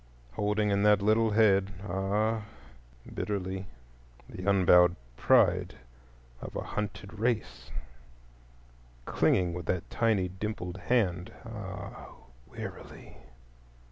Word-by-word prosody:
Holding 105 +5 0
in 100 0 +2
that 105 -1 +5
little 110 +2 +3
head—ah, 100 +1 +1 0.7
bitterly!—he 65 - -7
unbowed 90 -2 +5 0.2
pride - - +3 0.7
of - - -8
a - - -2
hunted 105 0 -5
race, 110 - -2 1.4
clinging 90 -2 +2
with 90 +1 -6
that 90 -2 -1
tiny 110 -5 +2
dimpled 95 -1 -5
hand—ah, 100 -1 -3 0.3
wearily! - - -9
100 Hz, 80 wpm, -29 LUFS, 90-105 Hz, 1.4 s, that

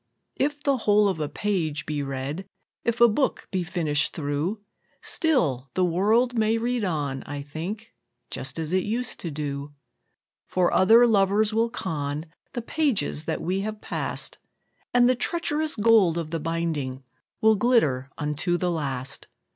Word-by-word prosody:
II. 275 - +4
If 290 0 -10
the 280 -2 +2
whole 210 -2 +4
of 190 -5 -1
a 150 -1 -2
page 165 -8 -1
be 150 -1 -2
read, 140 +6 -4 0.4
If 235 0 0
a 235 - +8
book 260 +5 0
be 185 -2 0
finished 160 -4 0
through, 155 +7 -2 0.4
Still 150 - +1
the 185 0 +3
world 215 +8 +2
may 220 0 +2
read 240 0 -1
on, 145 -7 -1
I 145 0 -5
think, 180 +10 -6 0.4
Just 130 +2 -4
as 160 +1 -3
it 185 - +3
used 235 +4 -2
to 170 - -4
do; 145 -1 -5 0.7
For 180 -1 +1
other 225 +5 +7
lovers 210 0 +3
will 230 +1 +2
con 150 -7 -3 0.3
The 240 - -3
pages 230 - 0
that - - -2
we 185 +3 0
have 215 +1 -4
passed, - - -3 0.5
And 245 0 +5
the 255 - +5
treacherous 310 +3 -1
gold 210 -6 +4
of 160 -2 -3
the 165 - -1
binding 155 -5 -2 0.4
Will 220 0 +5
glitter 155 - +2
unto 150 +4 0
the 180 0 0
last. 140 -5 -3
185 Hz, 160 wpm, -25 LUFS, 150-225 Hz, 0.7 s, a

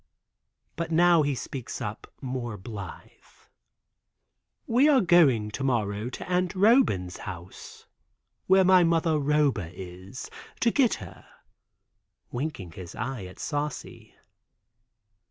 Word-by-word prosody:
But 170 0 -3
now 170 0 +5
he 145 -2 0
speaks 130 -1 -6
up 105 +2 -6
more 125 -4 -4
blithe. 100 -2 -8 1.6
"We 255 +6 +4
are 280 -3 +6
going 150 - +4
to 135 - -4
morrow 110 -3 -1
to - - -8
Aunt 180 0 0
Roban's 185 - +3
house, 90 -2 -9 0.6
where 190 0 +6
my 185 -1 +6
mother 165 -2 +2
Roba 140 - +1
is, 95 +5 -9 0.3
to 235 - +3
get 255 -3 +3
her," 95 -6 -12 1.0
winking 120 - -4
his 90 +1 -10
eye 125 -6 -4
at 90 - -11
Saucy. 145 -1 -5
135 Hz, 115 wpm, -27 LUFS, 105-175 Hz, 1.6 s, are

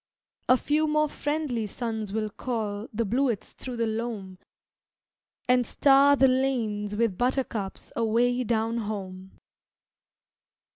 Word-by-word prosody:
A 255 - +7
few 305 +4 +1
more 305 0 +2
friendly 290 -7 -2
suns 220 -2 -4
will 215 0 -1
call 215 -2 -4
The 230 +1 -1
bluets 240 0 0
through 250 -2 -7
the 230 - +1
loam 220 -4 -4 1.1
And 250 0 +4
star 280 0 +5
the 270 -1 +5
lanes 230 -6 0
with 215 -4 0
buttercups 245 -6 -2
Away 240 +2 +2
down 225 0 0
home. 190 -3 -6
230 Hz, 115 wpm, -27 LUFS, 210-260 Hz, 1.1 s, A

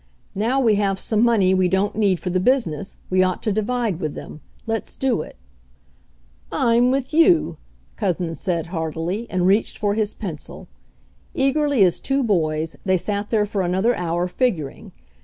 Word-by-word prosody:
"Now 230 +7 +1
we 225 -6 +3
have 195 -2 0
some 215 +1 0
money 210 -6 +4
we 185 -1 +3
don't 190 +3 0
need 200 -5 +2
for 180 - -3
the 185 - +1
business, 195 - 0
we 185 0 +4
ought 185 -1 0
to 215 - 0
divide 215 -2 -1
with 155 -3 -3
them. 155 - -9 0.2
Let's 225 -1 -3
do 255 -9 0
it" - - -10 1.2
"I'm 240 -1 +3
with 265 +2 -1
you!" 330 +1 +4 0.4
Couzens 180 -5 -1
said 170 -5 -1
heartily, 165 +6 -3
and 180 -1 0
reached 200 +4 +2
for 205 -1 0
his 215 -1 -1
pencil. 170 -9 -7 0.7
Eagerly 275 -3 +2
as 180 -2 +2
two 270 0 0
boys, 160 -6 0
they 185 -1 +2
sat 205 +3 -3
there 215 -2 +2
for 205 -1 -2
another 190 +7 +1
hour 175 0 -1
figuring. 180 - -2
200 Hz, 165 wpm, -22 LUFS, 180-235 Hz, 1.2 s, money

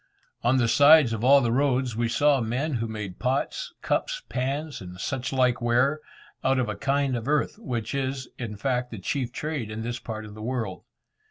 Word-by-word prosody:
On 120 +3 +3
the 120 -2 +3
sides 145 0 +6
of 110 0 -3
all 140 +2 +7
the 120 -2 +1
roads, 130 -2 +1
we 115 0 0
saw 145 +2 +3
men 130 +7 -1
who 115 -2 -1
made 105 -4 -6
pots, 140 - -1
cups, - - -1
pans, 140 +4 -2
and 90 -1 -9
such 135 +4 -3
like 125 -2 +2
ware, 125 +5 +2 0.4
out 135 0 +3
of 125 -3 +1
a 105 - -3
kind 140 +1 0
of 115 +1 -4
earth, 150 +7 0
which 120 - -3
is, 135 -1 -2
in 110 -4 -5
fact, 125 +1 -1
the 110 - -7
chief 125 +5 -2
trade 150 -5 -4
in 110 +1 -5
this 120 +1 -3
part 110 -1 -6
of 105 - -10
the 110 - -10
world. 115 -5 -3
125 Hz, 200 wpm, -26 LUFS, 115-140 Hz, 0.4 s, all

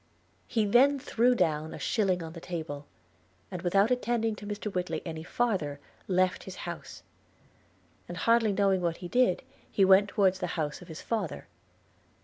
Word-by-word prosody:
He 225 -4 +1
then 260 +7 +5
threw 250 -1 +2
down 155 -7 0
a - - -7
shilling 190 -6 0
on 160 0 -7
the 165 - -9
table; 155 -5 -5 0.6
and 180 - -5
without 195 +6 +3
attending 235 -3 0
to 205 - -9
Mr 205 0 -4
Whitly 175 -3 -2
any 160 -2 -5
farther, 175 -7 -1 0.3
left 185 -1 +1
his 190 - -7
house: 170 -1 -7 1.0
and 175 - -7
hardly 230 0 +3
knowing 195 -2 +2
what 170 -1 -1
he 180 - -7
did, 245 -1 +2 0.3
he 195 - +4
went 195 +2 +6
towards 190 -2 +2
the 180 - -2
house 150 +2 -2
of 180 - -12
his 160 -2 -9
father. 215 -7 -3
190 Hz, 165 wpm, -29 LUFS, 170-220 Hz, 1.0 s, went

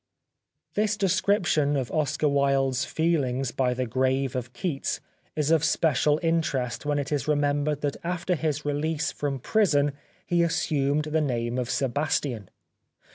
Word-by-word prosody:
This 210 0 +1
description 185 -6 +2
of 130 -3 -3
Oscar 155 -1 0
Wilde's 135 -2 +2
feehngs 135 -6 0
by 125 -2 +1
the 130 +1 -1
grave 130 +2 0
of 125 -1 -4
Keats 135 +2 -2 0.4
is 150 0 0
of 160 -2 +4
special 150 -2 +2
interest 145 -7 0
when 145 -1 +1
it 140 0 -3
is 145 -3 -1
remembered 145 0 +1
that 145 -1 -1
after 180 +1 -1
his 150 -3 -2
release 150 +1 -1
from 140 -2 -3
prison 145 - +2 0.3
he 175 -1 +2
assumed 150 -3 +1
the 155 +1 0
name 120 -3 -1
of 125 -1 -3
Sebastian. 135 -4 -1
145 Hz, 140 wpm, -26 LUFS, 130-160 Hz, 0.4 s, of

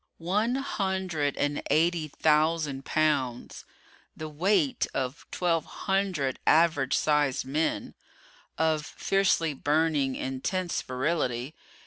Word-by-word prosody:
One 210 +8 0
hundred 190 - -1
and 145 0 0
eighty 160 +2 +2
thousand 150 -2 +1
pounds 135 -6 -1 0.5
the 155 - -5
weight 165 -1 +1
of 130 +4 -3
twelve 170 -3 0 0.2
hundred 190 -9 0
average 155 -5 +4
sized 150 -4 +1
men 150 +5 -1 0.6
of 160 -1 +1
fiercely 175 -2 +1
burning, 145 -1 +1
intense 170 +8 -2
virility. 130 -1 -2
155 Hz, 95 wpm, -28 LUFS, 140-170 Hz, 0.6 s, average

